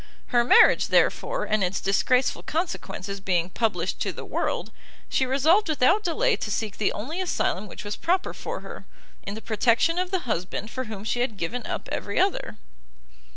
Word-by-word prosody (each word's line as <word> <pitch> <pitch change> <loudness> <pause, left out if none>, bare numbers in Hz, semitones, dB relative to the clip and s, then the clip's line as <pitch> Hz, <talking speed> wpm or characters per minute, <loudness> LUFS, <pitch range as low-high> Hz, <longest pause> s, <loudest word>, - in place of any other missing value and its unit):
Her 240 -1 +4
marriage, 235 - +6
therefore, - - +2
and 215 -2 +1
its 185 +1 0
disgraceful 250 +6 +2
consequences 200 - -4
being 180 -2 0
published 185 -6 -1
to - - -1
the - - -8
world, - - -2 0.4
she 260 - +1
resolved 320 +9 +3
without 310 +8 +3
delay 440 +7 +2
to - - -4
seek 210 0 -3
the 210 - +2
only 300 - -4
asylum 215 - -1
which - - -9
was 205 0 -4
proper 365 +2 0
for - - -5
her, - - -10 0.3
in 200 - -6
the 220 - -7
protection 235 +10 +2
of 365 0 -1
the 375 -2 -1
husband 215 - -3
for 260 0 -4
whom 215 -3 -7
she 230 +2 -1
had 240 -4 -1
given 215 +8 -3
up - - -4
every - - -2
other. 390 +1 0
240 Hz, 180 wpm, -25 LUFS, 200-330 Hz, 0.4 s, marriage